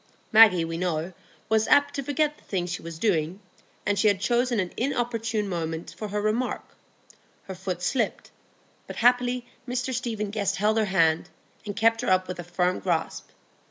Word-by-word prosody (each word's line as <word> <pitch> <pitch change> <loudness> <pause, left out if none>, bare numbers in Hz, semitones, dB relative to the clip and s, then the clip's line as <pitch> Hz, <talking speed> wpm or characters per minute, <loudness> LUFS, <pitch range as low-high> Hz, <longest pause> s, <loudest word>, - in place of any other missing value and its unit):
Maggie, 210 -6 +7
we 165 0 -4
know, 175 0 -2 0.3
was 220 0 +2
apt 285 0 +4
to 285 - -2
forget 295 +2 -1
the - - -24
thing 180 -3 -2
she 180 0 -4
was 165 -1 -8
doing, 175 -2 0 0.5
and 205 -1 +1
she 215 - +4
had 200 -2 +3
chosen 240 +2 +1
an 180 -2 -2
inopportune 230 -4 -1
moment 165 -3 -4
for 215 - -5
her 210 +1 -2
remark; 215 +4 -1 0.8
her 190 - -7
foot 180 -1 -5
slipped, 235 +1 -1 0.6
but - - -7
happily 245 0 +2 0.2
Mr 250 +1 -2
Stephen 225 -4 -3
Guest 205 -2 -1
held 215 +3 +2
her 215 - +2
hand, 165 -5 +2 0.4
and 205 - -4
kept 225 +1 +3
her 245 - -1
up 185 0 +3
with 180 -1 -6
a - - -4
firm 180 +1 0
grasp. 170 -4 -2
210 Hz, 180 wpm, -26 LUFS, 180-240 Hz, 0.8 s, Maggie